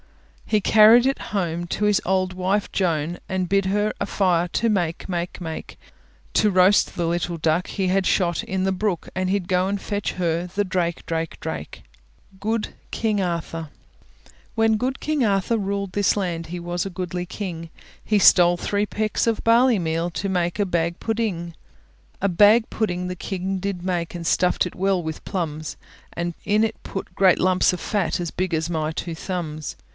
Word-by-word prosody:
He 215 - +3
carried 220 +4 +7
it 270 +1 +1
home 175 -4 -1
To 210 - -1
his 210 -1 +3
old 185 0 +1
wife 190 +3 0
Joan, 170 -2 0
And 185 -1 -1
bid 195 +1 +2
her 205 +2 +1
a - - +1
fire 180 -4 +1
for - - -26
to 230 - +2
make, 175 -5 -1
make, 175 -1 -3
make; 160 -3 -6 0.6
To 215 - +4
roast 185 +1 +4
the 170 - -1
little 170 0 -1
duck 160 +2 +1
He 195 -2 -2
had 190 +1 +2
shot 175 -3 +1
in 190 0 -2
the 190 - +1
brook, 190 -2 -2
And 185 0 0
he'd 195 -2 0
go 185 -1 +2
and 200 +1 -1
fetch 205 0 -3
her 170 -1 -1
the 200 +3 -1
drake, 175 -2 -1
drake, 165 0 -3
drake. - - -6 0.6
GOOD 220 +2 -1 0.2
KING 215 -3 0
ARTHUR 165 -3 -3 0.9
When 225 -1 +3
good 255 +5 -2
king 305 -3 0
Arthur 200 +1 +1
ruled 200 -2 -3
this 205 0 +2
land, 170 -4 -2
He 175 +2 -5
was 175 +1 -3
a - - -3
goodly 180 -1 -4
king; 170 -5 -6 0.3
He 210 - +2
stole 175 -2 +6
three 205 +3 -1
pecks 215 +2 -1
of 225 -2 0
barley 235 0 +5
meal, 165 0 -1
To 190 +3 -3
make 180 0 -1
a 205 - +3
bag 170 -1 -1
pudding. 210 -7 -2 0.7
A 200 - +1
bag 210 +5 +5
pudding 180 -5 -2
the 180 - -4
king 190 +1 -3
did 190 -2 -3
make, 175 -2 -2
And 170 -1 -4
stuffed 180 +3 +2
it 180 - -6
well 190 -1 +1
with 160 -1 -6
plums; 155 -5 -4 0.3
And 170 0 -3
in 210 +2 +2
it 220 -1 -5
put 195 - -6
great 190 -2 +4
lumps 185 0 +3
of 180 - -4
fat, 200 -2 -1
As 175 -2 -3
big 185 -1 -2
as 160 +1 -1
my 155 -2 -1
two 165 +1 -4
thumbs. 160 -4 -5
185 Hz, 190 wpm, -23 LUFS, 170-205 Hz, 0.9 s, carried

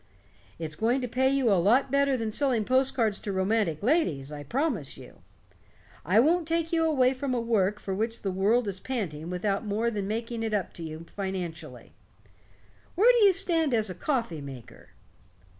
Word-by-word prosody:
It's 160 -2 -5
going 235 - +1
to 250 - -2
pay 260 +3 +1
you 270 -4 +2
a 185 -3 +4
lot 250 +8 +3
better 280 -1 +2
than 225 -2 -3
selling 245 -3 0
post 260 +2 +2
cards 220 -5 +1
to 205 - -5
romantic 190 -3 0
ladies, 175 - +1
I 150 -1 -6
promise 225 - -2
you. - - -14 0.8
I 185 +7 +3
won't 325 +6 +3
take 330 0 -1
you 325 -1 +3
away 265 -5 +3
from 260 -1 -2
a - - 0
work 210 -3 +1
for 195 - -4
which 225 +4 -3
the 195 - -1
world 210 +5 +2
is 195 -2 -4
panting 175 - -4
without 195 +3 -1
more 220 +2 -1
than 205 -3 -3
making 230 +2 -3
it 220 -1 -1
up 195 -4 -2
to 170 - -8
you 160 +1 -7
financially. 190 -4 -6 1.0
Where 435 +8 +6
do 425 - +6
you 395 - +7
stand 330 -7 0
as 215 -3 0
a - - -4
coffee 230 - -2
maker?" 135 -4 -11
225 Hz, 190 wpm, -27 LUFS, 190-265 Hz, 1.0 s, you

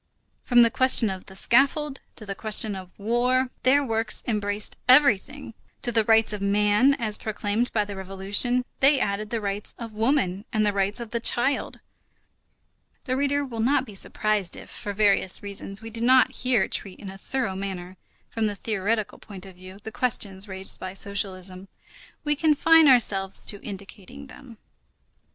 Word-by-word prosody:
From 240 -1 +5
the 230 - +2
question 255 -5 +5
of 185 -1 -8
the 190 - -13
scaffold 275 +6 +1 0.2
to 215 - -10
the 200 - -4
question 215 0 +1
of 185 -1 -11
war, 250 +4 0
their 280 +3 +3
works 225 -2 0
embraced 205 -2 -2
everything. 260 -1 +3 0.3
To 240 - +1
the 225 -1 +2
rights 225 0 +3
of 210 - -5
man, 210 +6 +3
as 215 -4 0
proclaimed 215 +2 -2
by 210 -2 0
the 205 - -7
French - - -9
Revolution, 205 +6 0
they 275 +1 +4
added 205 -1 -2
the 230 - -2
rights 205 0 -5
of 230 -2 -8
woman 215 -4 0
and 215 -2 +1
the 205 - +1
rights 200 +2 -1
of 235 -2 -8
the 235 - -2
child. 240 +4 0 1.2
The 255 - -2
reader 285 +1 0
will 235 -4 -7
not 260 +3 +1
be 215 - -12
surprised 205 -1 -1
if, - - -12
for 205 - -6
various 200 -2 +1
reasons, 200 +1 -5
we 225 - -8
do 230 +1 -6
not 255 +2 +4
here 250 -5 0
treat 195 -2 -4
in 195 - -9
a 195 - -11
thorough 245 -4 -3
manner, 190 -2 -6 0.3
from 225 -1 -2
the 205 - -4
theoretical 215 +1 -2
point 195 -3 -10
of 190 - -12
view, 185 +1 -13
the 220 - -7
questions 205 -5 -1
raised 190 -1 -4
by 185 0 -7
socialism. 190 -2 -2 0.6
We 295 0 0
confine 320 +1 +4
ourselves 195 -7 +3
to 205 - -1
indicating 200 +6 -10
them. 260 -3 -14
215 Hz, 175 wpm, -24 LUFS, 200-250 Hz, 1.2 s, From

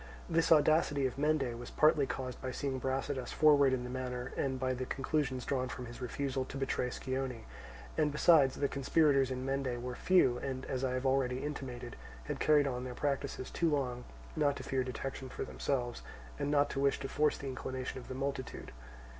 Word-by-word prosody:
This 165 0 +2
audacity 150 -2 +4
of 130 +1 -2
Mende 140 -6 +1
was 120 - -7
partly 150 -2 +4
caused 130 -1 -5
by 130 - -3
seeing 130 +1 -2
Brasidas 130 0 -2
forward 145 -3 +5
in 130 -1 0
the 125 - -5
matter 125 -1 -4
and 130 -2 -1
by 130 0 0
the 130 0 -4
conclusions 135 -2 -1
drawn 130 -2 -1
from 125 - -6
his 120 +2 -10
refusal 130 +1 -2
to 135 - -7
betray 135 -2 -1
Scione; 130 -2 -3 0.6
and 150 -1 +3
besides, 150 -3 +5
the 140 - +1
conspirators 140 -1 +3
in 130 0 -3
Mende 135 -2 -1
were 125 +1 -4
few, 130 -5 +3
and, 130 -1 -4
as 130 0 -3
I 130 -1 0
have 130 +1 -2
already 130 -1 +1
intimated, 130 -5 -5 0.3
had - - -4
carried 150 -2 +4
on 125 -2 -2
their 125 -1 -6
practices 140 -2 -2
too 170 - +1
long 125 -4 -1 0.3
not 145 -3 +2
to - - -7
fear 130 -1 0
detection 130 +1 -5
for - - -4
themselves, 120 -4 -2 0.4
and 140 - -1
not 145 0 +3
to 135 - -3
wish 140 0 +2
to 135 - -3
force 150 +2 +1
the - - -8
inclination 130 0 -4
of 125 - -12
the 130 - -6
multitude. 135 -1 -4
135 Hz, 195 wpm, -33 LUFS, 125-140 Hz, 0.6 s, forward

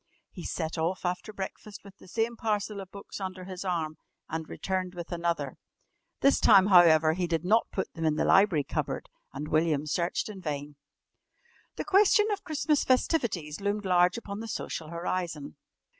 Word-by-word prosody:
He 180 - -9
set 160 0 -3
off 180 +4 -1
after 180 +4 -2
breakfast 205 +1 -7
with 200 0 -14
the - - -15
same 225 +4 -1
parcel 210 -2 -2
of 190 - -10
books 200 +1 -9
under 185 -1 -5
his 185 0 -7
arm 165 -4 -2 0.3
and 160 0 -5
returned 185 -1 -3
with 175 0 -7
another. 170 -1 -2 0.6
This 275 - +4
time, 190 -1 +7
however, 165 -5 +6
he 175 +1 -1
did 165 0 -1
not 220 +5 +3
put 190 - -3
them 165 - -5
in 155 -1 +2
the - - +1
library 190 -7 +4
cupboard, - - -3 0.2
and 145 +2 -6
William 155 -2 +1
searched 170 +3 -1
in 205 -3 -8
vain. 145 -2 -4 1.0
The - - -4
question 405 +1 +5
of 405 -1 -3
Christmas 300 -1 +1
festivities 215 - 0
loomed 205 +1 -1
large 180 0 +3
upon 205 -3 -6
the 225 - -6
social 165 -6 -4
horizon. 170 - -4
185 Hz, 175 wpm, -28 LUFS, 165-205 Hz, 1.0 s, time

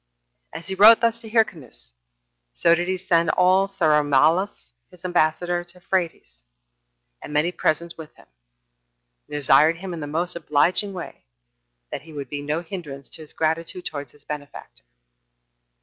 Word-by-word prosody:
And 165 - -8
as - - -14
he 190 - -3
wrote 215 +4 +8
thus 230 -1 +1
to 225 -2 -10
Hyrcanus, 150 - -1 0.6
so 170 - +4
did 175 +1 0
he 185 0 -1
send 175 -2 +2
also 190 0 +2
Saramallas, 150 - +2 0.2
his 180 0 -16
ambassador, 175 0 +1
to 175 +1 -16
Phraates, 170 - -3 0.8
and - - -9
many 150 +4 +1
presents 170 0 -1
with 155 -1 -11
him, - - -19 1.0
and - - -13
desired 150 +3 +4
him 185 +1 -6
in 170 - -6
the 145 - -5
most 170 +4 -2
obliging 170 +5 +1
way 175 - -9 0.7
that - - -4
he 160 0 -14
would 140 -3 -6
be 145 -1 -4
no 150 +3 -2
hinderance 155 -6 -8
to - - -2
his 155 - -7
gratitude 165 +3 -1
towards 145 -2 -5
his 145 - -22
benefactor. 145 - -9
165 Hz, 160 wpm, -23 LUFS, 150-180 Hz, 1.0 s, wrote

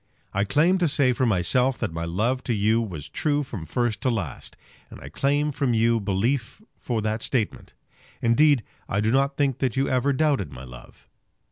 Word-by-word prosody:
I 100 +1 +1
claim 165 - +3
to 175 - +2
say 140 -3 +3
for 130 0 0
myself 125 +6 +2
that - - -3
my 85 0 -3
love 115 +10 -1
to 120 - 0
you 110 +3 +2
was 85 -10 -6
true 145 - 0
from 100 - -7
first 120 - -1
to 130 - +1
last, 100 - -4 0.3
and - - -11
I 70 - -10
claim 145 - 0
from 130 -4 0
you 115 +1 +3
belief 110 - -1 0.2
for 115 -4 -2
that 110 +1 -1
statement. 115 -5 -2 0.4
Indeed 135 +2 +3 0.3
I 100 - 0
do 110 +2 +1
not 140 +2 +1
think 140 -4 0
that 130 -4 -1
you 135 - +2
ever 130 +2 +1
doubted 140 - 0
my 65 -1 -10
love. 60 -1 -14
120 Hz, 195 wpm, -24 LUFS, 100-140 Hz, 0.4 s, claim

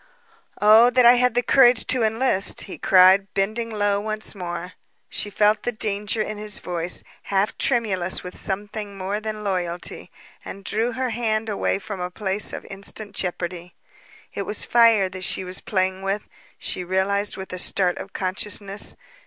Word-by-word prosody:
"Oh, 220 +3 +7
that 250 0 +4
I 240 - +9
had 250 -1 +2
the 245 - +2
courage 245 -1 +5
to 255 - +2
enlist," 220 -2 +2
he 190 - -7
cried, 190 +1 +5
bending 220 +4 -1
low 205 -2 +1
once 215 +1 -1
more. 180 -2 -6 0.4
She 205 - -4
felt 210 +1 +2
the 245 - -2
danger 215 0 -1
in 215 -1 -6
his 210 -1 -4
voice, 175 0 -3 0.2
half 200 +1 0
tremulous 195 -8 0
with 180 - -8
some 200 +1 -3
thing 205 -2 -7
more 195 +2 -2
than 215 -1 -5
loyalty, 180 -3 -3 0.3
and 195 - -9
drew 225 +4 -1
her 255 0 -2
hand 220 -1 -1
away 200 -2 0
from 195 0 -7
a 180 0 -3
place 195 +1 -2
of - - -7
instant 200 +1 -8
jeopardy. 175 -1 -4 0.6
It - - -3
was 210 - -3
fire 230 -5 +5
that 185 0 -7
she 190 - +1
was 185 +1 -3
playing 190 -1 -1
with, 195 +1 -2 0.3
she 180 - -3
realized 195 +3 0
with 190 -1 -7
a 180 - -2
start 180 -1 0
of 195 - -8
consciousness. 195 +1 -1
200 Hz, 170 wpm, -23 LUFS, 190-220 Hz, 0.6 s, I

